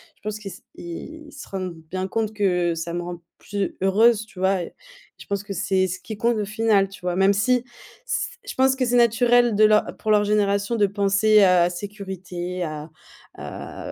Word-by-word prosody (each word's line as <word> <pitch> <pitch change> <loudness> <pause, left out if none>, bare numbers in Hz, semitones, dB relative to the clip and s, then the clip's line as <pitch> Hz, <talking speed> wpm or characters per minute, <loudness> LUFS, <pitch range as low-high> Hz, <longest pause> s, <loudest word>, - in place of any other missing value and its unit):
Je - - -35
pense 215 +1 -4
qu'ils 200 -2 -7
se - - -12
ils 305 - -9
se 285 - -10
rendent 185 -2 -4 0.2
bien 185 +1 -2
compte 220 +1 -1
que 180 -5 +1
ça 165 +1 -4
me 175 - -2
rend 175 0 -7 0.2
plus 200 -2 -3
heureuse, 215 +3 +4
tu 190 - -14
vois? 190 0 +2
Et, - - -9 0.4
je - - -13
pense 200 0 -3
que 205 - -9
c'est 190 0 +1
ce 185 +1 -5
qui 220 - -7
compte 235 +2 +1
au 210 - -1
final, 210 -2 +2
tu 195 - -12
vois? 180 -1 -2
Même 195 +1 +4
si, 245 +5 +1 0.4
s - - -2 0.2
je - - -4
pense 265 0 +3
que 260 -1 0
c'est 240 - +1
naturel 240 0 +4
de 215 - +4
leur 215 0 +4
pour 215 - -1
leur 210 -1 +4
génération 205 +1 +1
de 210 -3 +3
penser 205 +2 +3
à 180 -2 +5
sécurité, 185 -2 -6
à 155 -1 -6 0.5
à - - -8
200 Hz, 205 wpm, -23 LUFS, 185-220 Hz, 0.5 s, à